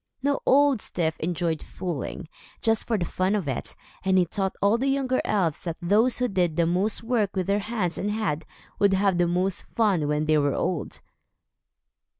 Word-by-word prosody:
Now 285 Hz, 0 st, +1 dB
Old 280 Hz, -2 st, +5 dB
Styf 160 Hz, -3 st, -1 dB
enjoyed 165 Hz, -1 st, -1 dB
fooling, 175 Hz, -5 st, -5 dB, 0.3 s
just 225 Hz, -1 st, +1 dB
for 225 Hz, -, +1 dB
the 175 Hz, -, -1 dB
fun 185 Hz, +4 st, 0 dB
of 195 Hz, -8 st, -2 dB
it, 135 Hz, -, -4 dB, 0.3 s
and 190 Hz, 0 st, +3 dB
he 180 Hz, -, +4 dB
taught 190 Hz, +2 st, -2 dB
all 205 Hz, +4 st, +3 dB
the 270 Hz, -, 0 dB
younger 270 Hz, -2 st, +1 dB
elves 180 Hz, -8 st, 0 dB
that 170 Hz, -2 st, -3 dB
those 210 Hz, +8 st, +2 dB
who 250 Hz, -, +1 dB
did 180 Hz, -7 st, 0 dB
the 170 Hz, -, +2 dB
most 190 Hz, +7 st, 0 dB
work 225 Hz, -5 st, 0 dB
with 185 Hz, -1 st, 0 dB
their 200 Hz, +2 st, +1 dB
hands 200 Hz, -6 st, -2 dB
and 205 Hz, -, -1 dB
head, 205 Hz, -8 st, -1 dB, 0.4 s
would 200 Hz, -1 st, +4 dB
have 190 Hz, -2 st, +2 dB
the 175 Hz, -, +3 dB
most 180 Hz, +2 st, 0 dB
fun 195 Hz, -10 st, +2 dB
when 150 Hz, +1 st, 0 dB
they 155 Hz, -1 st, +3 dB
were 145 Hz, -1 st, +1 dB
old. 170 Hz, -6 st, -2 dB
190 Hz, 190 wpm, -25 LUFS, 170-215 Hz, 0.4 s, Old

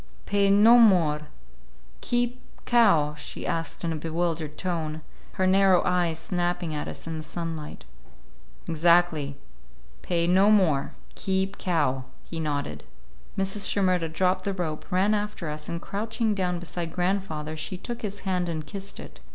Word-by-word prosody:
"Pay 200 Hz, 0 st, +2 dB
no 215 Hz, +4 st, +7 dB
more, 165 Hz, -9 st, +4 dB, 0.7 s
keep 245 Hz, +1 st, 0 dB, 0.2 s
cow?" 195 Hz, -12 st, +4 dB
she 150 Hz, -, -7 dB
asked 165 Hz, +1 st, -3 dB
in 165 Hz, -1 st, 0 dB
a -, -, -3 dB
bewildered 160 Hz, -1 st, -2 dB
tone, 160 Hz, -4 st, -3 dB, 0.3 s
her 185 Hz, -, 0 dB
narrow 190 Hz, -1 st, +5 dB
eyes 175 Hz, -3 st, +1 dB
snapping 175 Hz, -1 st, -2 dB
at 150 Hz, -, -3 dB
us -, -, -6 dB
in 165 Hz, -1 st, -4 dB
the -, -, -6 dB
sunlight. 160 Hz, -1 st, -6 dB, 0.8 s
"Exactly. 165 Hz, -3 st, +3 dB, 0.7 s
Pay 170 Hz, -2 st, 0 dB
no 190 Hz, +4 st, +5 dB
more, 175 Hz, -10 st, +3 dB, 0.2 s
keep 190 Hz, +1 st, -1 dB
cow." 145 Hz, -7 st, 0 dB, 0.2 s
He 165 Hz, -, -6 dB
nodded. 145 Hz, -, -3 dB, 0.5 s
Mrs. 195 Hz, +1 st, -1 dB
Shimerda 185 Hz, -4 st, +1 dB
dropped 185 Hz, +2 st, +1 dB
the 200 Hz, -, -1 dB
rope, 165 Hz, -5 st, -4 dB
ran 190 Hz, +4 st, +3 dB
after 210 Hz, -6 st, -2 dB
us, 150 Hz, 0 st, -5 dB
and 170 Hz, -, -3 dB
crouching 220 Hz, +4 st, -2 dB
down 180 Hz, -3 st, -1 dB
beside 175 Hz, -1 st, -5 dB
grandfather, 175 Hz, -5 st, -1 dB
she 160 Hz, +4 st, -4 dB
took 235 Hz, +5 st, -6 dB
his 205 Hz, -2 st, -5 dB
hand 180 Hz, -2 st, -1 dB
and 155 Hz, -2 st, -4 dB
kissed 195 Hz, +5 st, -7 dB
it. -, -, -11 dB
175 Hz, 150 wpm, -26 LUFS, 160-195 Hz, 0.8 s, no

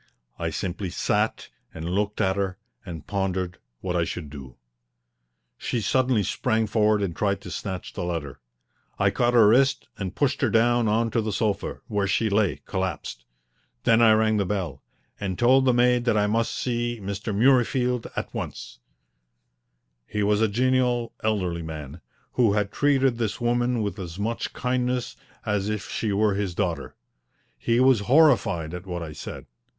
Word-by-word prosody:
I -, -, -1 dB
simply 95 Hz, +1 st, -3 dB
sat -, -, -1 dB, 0.3 s
and 80 Hz, 0 st, -5 dB
looked 100 Hz, +3 st, -1 dB
at 95 Hz, 0 st, +2 dB
her 95 Hz, -2 st, -2 dB, 0.3 s
and 85 Hz, -6 st, -8 dB
pondered 95 Hz, -3 st, -2 dB, 0.2 s
what 90 Hz, -1 st, -2 dB
I 85 Hz, -, +2 dB
should 80 Hz, -3 st, -5 dB
do. 65 Hz, -4 st, -10 dB, 1.0 s
She 120 Hz, -, -2 dB
suddenly 125 Hz, +1 st, +2 dB
sprang 110 Hz, +3 st, 0 dB
forward 105 Hz, -1 st, +2 dB
and 85 Hz, -4 st, -2 dB
tried 100 Hz, -1 st, 0 dB
to 90 Hz, -, -9 dB
snatch 95 Hz, +2 st, -5 dB
the 90 Hz, -, -4 dB
letter. 80 Hz, -6 st, -4 dB, 0.6 s
I -, -, +3 dB
caught 120 Hz, 0 st, +1 dB
her 115 Hz, -3 st, +7 dB
wrist 135 Hz, +3 st, +3 dB
and 95 Hz, -2 st, -4 dB
pushed 140 Hz, -2 st, 0 dB
her 130 Hz, -, +3 dB
down 120 Hz, +1 st, +3 dB
on 115 Hz, +2 st, +1 dB
to 115 Hz, -, +1 dB
the 110 Hz, 0 st, -2 dB
sofa, 105 Hz, 0 st, -2 dB
where 100 Hz, -2 st, -1 dB
she 100 Hz, +4 st, +1 dB
lay, 100 Hz, -2 st, +1 dB
collapsed. 95 Hz, -10 st, -4 dB, 0.6 s
Then 115 Hz, 0 st, +4 dB
I 110 Hz, -2 st, +7 dB
rang 110 Hz, 0 st, +3 dB
the 100 Hz, -, +2 dB
bell, 90 Hz, -10 st, -3 dB, 0.4 s
and 95 Hz, -3 st, -3 dB
told 130 Hz, +2 st, +4 dB
the 130 Hz, -, +5 dB
maid 125 Hz, 0 st, +3 dB
that 115 Hz, -3 st, +2 dB
I 105 Hz, -, +3 dB
must 115 Hz, +2 st, 0 dB
see 120 Hz, -1 st, -2 dB
Mr. 100 Hz, +2 st, -4 dB
Murreyfield 125 Hz, +1 st, +2 dB
at -, -, -4 dB
once. -, -, -6 dB, 1.3 s
He 105 Hz, -, -1 dB
was 105 Hz, +1 st, +2 dB
a 110 Hz, -, +4 dB
genial, 125 Hz, +1 st, +1 dB
elderly 90 Hz, -6 st, 0 dB
man, 80 Hz, -1 st, -7 dB, 0.3 s
who 115 Hz, -5 st, +3 dB
had 105 Hz, -1 st, 0 dB
treated 135 Hz, -4 st, +2 dB
this 110 Hz, -3 st, -2 dB
woman 120 Hz, -1 st, +1 dB
with 100 Hz, -1 st, -4 dB
as 85 Hz, -2 st, -6 dB
much 115 Hz, +3 st, -2 dB
kindness 125 Hz, 0 st, -1 dB, 0.3 s
as 105 Hz, -1 st, 0 dB
if 105 Hz, -2 st, -4 dB
she 110 Hz, -, -1 dB
were 105 Hz, +1 st, +2 dB
his 95 Hz, -3 st, -2 dB
daughter. 85 Hz, -7 st, -2 dB, 0.6 s
He 115 Hz, 0 st, +1 dB
was 130 Hz, -2 st, +5 dB
horrified 105 Hz, -, +3 dB
at 90 Hz, +2 st, -7 dB
what 90 Hz, -2 st, -4 dB
I 80 Hz, -, -7 dB
said. 75 Hz, -, -8 dB
105 Hz, 170 wpm, -25 LUFS, 95-120 Hz, 1.3 s, her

